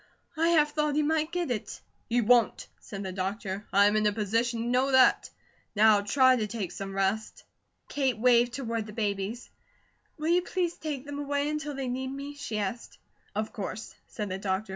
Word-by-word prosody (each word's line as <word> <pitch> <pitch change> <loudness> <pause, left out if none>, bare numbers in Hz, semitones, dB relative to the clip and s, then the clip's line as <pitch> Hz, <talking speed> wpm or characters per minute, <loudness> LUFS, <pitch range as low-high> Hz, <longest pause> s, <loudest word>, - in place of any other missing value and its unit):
"I 330 +1 +2
half 300 -3 +4
thought 300 -1 0
he 305 - +2
might 310 +1 0
get 350 -6 -2
it." 215 -4 -4 0.3
"He 240 +1 +2
WON'T!" 235 0 +3
said 200 0 -7
the 190 - -4
doctor. 195 +1 -4
"I'm 200 +2 +5
in 215 0 +3
a - - +3
position 225 +3 0
to - - -4
know 255 +3 +2
that. 260 -1 +5 0.5
Now 210 0 +6
try 260 +5 +4
to 215 -2 -1
take 210 -4 -4
some 195 0 -6
rest." 195 +3 -1 0.4
Kate 265 -5 0
waved 240 +1 +4
toward 230 -4 -3
the 210 - -9
babies: 205 +2 -3 0.7
"Will 310 +1 -2
you 350 +1 +4
please 360 -1 -1
take 295 -5 -5
them 285 0 -6
away 285 0 -1
until 300 -1 -3
they 270 -1 -3
need 260 +1 -3
me?" 280 +1 -6
she 280 -7 -5
asked. 210 +3 -4 0.4
"Of 215 +1 -2
course," 215 +1 -6
said 210 -2 -5
the 185 +1 -4
doctor. 195 +1 -2
235 Hz, 190 wpm, -28 LUFS, 210-285 Hz, 0.7 s, Now